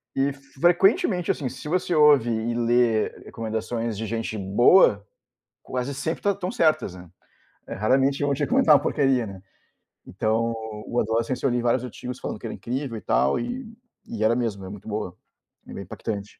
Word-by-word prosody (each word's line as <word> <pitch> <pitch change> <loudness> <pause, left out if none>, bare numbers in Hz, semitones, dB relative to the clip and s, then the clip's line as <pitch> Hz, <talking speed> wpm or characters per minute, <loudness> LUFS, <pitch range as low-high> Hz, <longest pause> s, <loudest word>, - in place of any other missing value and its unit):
e 135 +1 +1
frequentemente, 175 - +2
assim, 135 -4 -3
se 130 +4 -9
você 180 +2 0
ouve 150 -6 +5
e 115 +1 -1
lê 120 -2 +2 0.2
recomendações 115 0 -4
de 110 - -3
gente 115 0 -3
boa 100 - +4 0.6
quase 130 +2 -4
sempre 160 +4 -3
tá 205 - +2
estão 185 -2 -4
certas, 155 - +1
né. 90 -1 -12 0.6
É, - - -5
raramente, 135 +7 +1
vão 145 0 +1
te 140 +2 -2
recomendar 150 +2 +5
uma 145 - +3
porcaria, 135 -5 +1
né, 95 -2 -10 0.6
então, 110 +4 -1 0.3
o 120 - -1
Adolescence, 115 +3 -1
eu 135 - +3
li 120 0 0
vários 120 +1 +1
artigos 125 +1 -7
falando - - -5
que - - -6
era - - -5
incrível 125 -1 -4
e - - -8
tal, 70 +1 +1
e 245 - -5 0.4
e 110 -2 -3
era 115 +2 +3
mesmo, 110 -6 -2
é - - -7
muito 100 +1 -10
boa, 105 -4 -4 0.5
é - - -9
bem 100 - -6
impactante. 100 +2 -6
120 Hz, 180 wpm, -24 LUFS, 110-140 Hz, 0.6 s, ouve